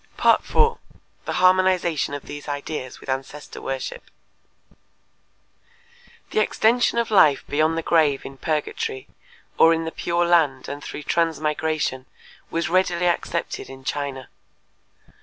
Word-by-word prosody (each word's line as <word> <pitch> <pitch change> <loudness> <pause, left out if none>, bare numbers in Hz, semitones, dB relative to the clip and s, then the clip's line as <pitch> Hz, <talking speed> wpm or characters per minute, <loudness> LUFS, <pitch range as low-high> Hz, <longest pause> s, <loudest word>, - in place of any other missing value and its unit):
4. 460 0 +3 0.5
The - - -3
Harmonization 185 -5 +2
of 145 - -7
These 145 +1 -9
Ideas 145 -2 -5
with - - -15
Ancestor 135 +2 -5
Worship 135 -1 -5 2.2
The - - +1
extension 235 +3 +2
of 235 -1 0
life 155 -9 +5
beyond 155 +2 +1
the 165 - -2
grave 155 -5 +2
in 135 - -9
purgatory, 400 - -2 0.5
or 165 0 +7
in 165 0 -3
the 160 - -4
Pure 175 +1 0
Land 160 -6 +2
and 145 +1 -6
through 150 - -7
transmigration 155 -4 -1 0.4
was 165 0 -1
readily 180 -1 +1
accepted 170 -1 -2
in 135 0 -11
China. 140 -2 -4
160 Hz, 120 wpm, -23 LUFS, 145-175 Hz, 2.2 s, or